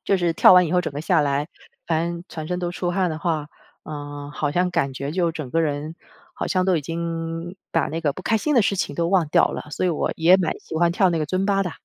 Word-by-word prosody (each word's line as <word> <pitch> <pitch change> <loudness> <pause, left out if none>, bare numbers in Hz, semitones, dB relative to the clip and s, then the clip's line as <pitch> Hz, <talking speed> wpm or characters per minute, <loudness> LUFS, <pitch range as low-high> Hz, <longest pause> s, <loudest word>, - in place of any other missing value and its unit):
就 195 - +2
是 175 -2 +1
跳 185 - +7
完 180 -1 +6
以 160 - -3
后 180 - +4
整 180 - -3
个 145 - -4
下 170 -1 +3
来， 145 +2 0 0.4
反 165 0 +1
正 170 0 -7
全 155 -1 -6
身 180 0 -2
都 175 -1 -2
出 175 0 -2
汗 180 -1 0
的 155 - -4
话， 160 -3 -2 0.3
呃， 145 -1 -7
好 145 - -1
像 180 +4 +1
感 135 -6 0
觉 140 +2 -4
就 175 -2 +1
整 155 -5 -6
个 165 - +1
人， 150 +1 -2 0.4
好 - - -3
像 185 -1 +1
都 185 -3 +2
已 - - -3
经 165 +2 -4 0.2
把 165 - +1
那 165 +2 -3
个 145 -4 0
不 185 - -8
开 225 - +1
心 300 +7 0
的 235 - +5
事 200 - +1
情 145 -6 -2
都 170 0 0
忘 180 -5 +2
掉 - - +4
了， - - -6
所 185 - -2
以 180 - +2
我 160 - -1
也 175 +3 +5
蛮 175 -4 -1
喜 - - -10
欢 170 +1 +3
跳 185 +1 +3
那 165 - 0
个 155 - -1
尊 185 +5 -1
巴 195 -1 +2
的。 180 - -3
165 Hz, 300 characters per minute, -23 LUFS, 155-180 Hz, 0.4 s, 跳